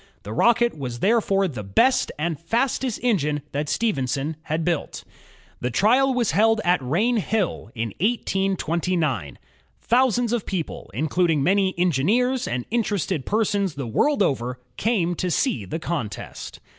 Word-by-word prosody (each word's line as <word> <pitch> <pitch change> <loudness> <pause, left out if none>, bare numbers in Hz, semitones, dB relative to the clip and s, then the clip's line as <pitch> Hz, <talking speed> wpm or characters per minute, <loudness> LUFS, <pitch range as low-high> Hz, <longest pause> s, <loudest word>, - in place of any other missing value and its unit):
The 105 - -6
Rocket 240 - +3
was 125 -5 -5
therefore 195 -3 +2
the 125 -10 -6
best 105 - +2
and 160 0 -2
fastest 240 +6 -1
engine 150 - +1
that 145 +1 -2
Stephenson 145 - -1
had 160 +1 -2
built. 170 -3 -2 0.6
The 125 - -1
trial 245 - +3
was 240 -4 +1
held 225 +5 +3
at 175 -4 +3
Rainhill, 205 - 0
in 115 0 -2
1829. 175 - 0 0.4
Thousands 245 -1 +2
of 235 -4 -2
people, 175 - -4
including 160 +2 +1
many 190 +3 +2
engineers 205 - +1
and 120 0 -2
interested 200 - -1
persons 205 -5 0
the 140 -2 -4
world 275 - +2
over, 125 -4 -1 0.2
came 195 -7 +1
to 180 - -1
see 120 - 0
the 95 - -4
contest. 155 -10 -5
180 Hz, 135 wpm, -23 LUFS, 140-225 Hz, 0.6 s, Rocket